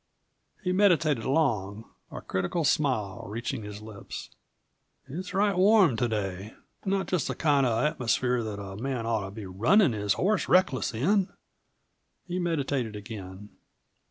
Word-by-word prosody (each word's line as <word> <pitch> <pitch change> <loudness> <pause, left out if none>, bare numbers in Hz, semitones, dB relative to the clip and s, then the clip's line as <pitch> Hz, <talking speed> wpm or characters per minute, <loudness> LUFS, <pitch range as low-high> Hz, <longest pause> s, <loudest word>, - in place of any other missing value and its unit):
He 180 - 0
meditated 165 - +3
long, 115 -8 0 0.3
a - - -7
critical 95 - -1
smile 130 -9 0
reaching 115 +4 -4
his 105 0 -8
lips. 110 -2 -9 0.8
"It's 180 +7 -6
right 200 +1 +2
warm 190 - +5
to 120 - +1
day. 100 -2 -4 0.3
Not 195 -1 0
just 180 -7 -1
the 130 - -3
kind 140 -3 +3
of 115 -2 +1
an - - +1
atmosphere 125 -1 0
that 105 -2 -5
a 95 -1 -7
man 125 0 -3
ought 110 -3 0
to - - -6
be 105 +1 -8
runnin' 120 - +3
his 105 -1 0
horse 195 - 0
reckless 135 -10 +3
in." 190 - +2 0.9
He 180 0 -3
meditated 140 -9 -1
again. 105 -2 -8
125 Hz, 150 wpm, -28 LUFS, 105-170 Hz, 0.9 s, warm